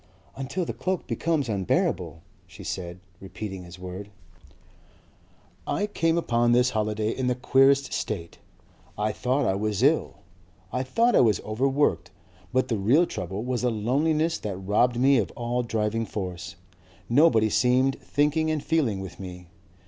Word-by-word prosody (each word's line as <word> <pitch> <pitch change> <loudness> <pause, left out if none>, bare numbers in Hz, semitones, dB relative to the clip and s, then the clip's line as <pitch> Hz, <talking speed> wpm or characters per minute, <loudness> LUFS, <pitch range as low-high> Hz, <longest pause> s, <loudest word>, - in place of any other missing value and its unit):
"Until 135 +7 -3
the - - -4
cloak 185 -1 -2
becomes 160 -5 -1
unbearable," 95 -5 -1 0.2
she - - -12
said, 90 -1 -5 0.2
repeating 95 -1 -7
his 85 0 -11
word. 90 +2 -8 1.6
"I 205 - 0
came 165 -5 0
upon 120 -7 +2
this 125 +1 +3
holiday 110 0 -1
in 130 +1 -2
the 125 - +1
queerest 135 +2 +3
state. 85 0 -4 0.6
I 105 +1 0
thought 130 +6 0
I 95 - +2
was 105 0 -1
ill. - - +2 0.6
I 125 - 0
thought 230 - +2
I - - +6
was 110 -5 +3
overworked. 110 - 0 0.4
But 130 +1 +1
the 115 -4 -1
real 130 - +4
trouble 95 - -5
was 125 -1 -2
a 125 - +3
loneliness 150 +9 +1
that 100 -3 -4
robbed 105 +6 +1
me 135 0 +5
of 105 - -1
all 120 +1 -1
driving 115 -1 -1
force. 90 -4 -5 0.5
Nobody 115 -5 +4
seemed 130 +3 +2
thinking 150 +2 +1
and 155 -2 -1
feeling 130 -12 0
with 95 - -9
me.... 90 -2 -9
120 Hz, 150 wpm, -26 LUFS, 100-135 Hz, 1.6 s, I